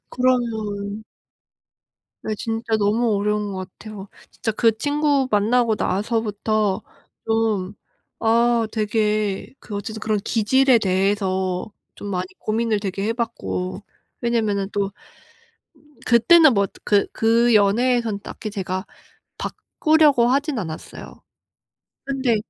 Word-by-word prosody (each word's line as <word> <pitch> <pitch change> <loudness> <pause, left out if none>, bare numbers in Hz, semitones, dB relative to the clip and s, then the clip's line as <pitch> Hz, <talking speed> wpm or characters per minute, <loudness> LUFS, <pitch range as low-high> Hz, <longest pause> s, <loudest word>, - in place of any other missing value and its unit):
그러면 220 -5 -1 1.2
네 215 - -2
진짜 225 +1 -2
너무 215 +2 +1
어려운 210 0 -1
거 190 - -5
같아요. 195 +2 -9 0.2
진짜 225 - -3
그 225 0 +2
친구 290 -1 +1
만나고 220 +2 +3
나서부터 210 0 0 0.4
좀 220 -4 0 0.4
아 230 0 +3
되게 210 -2 -1
그 210 - -9
어쨌든 220 +2 -5
그런 215 -1 0
기질에 240 +5 +3
대해서 190 -1 0 0.2
좀 205 - -8
많이 185 -2 -2
고민을 220 -1 0
되게 195 -1 -3
해 225 - +1
봤고 205 -5 -4 0.4
왜냐하면은 215 -4 0
또 200 -1 -1 1.2
그때는 270 +6 +6
뭐 200 -2 +2 0.2
그 205 -1 +3
그 230 +1 +3
연애에선 220 +1 +2
딱히 215 - -7
제가 190 -1 -4 0.5
바꾸려고 305 -6 +2
하지는 280 0 0
않았어요. 160 -3 -9 0.8
근데 270 -4 0
220 Hz, 230 characters per minute, -22 LUFS, 200-235 Hz, 1.2 s, 그때는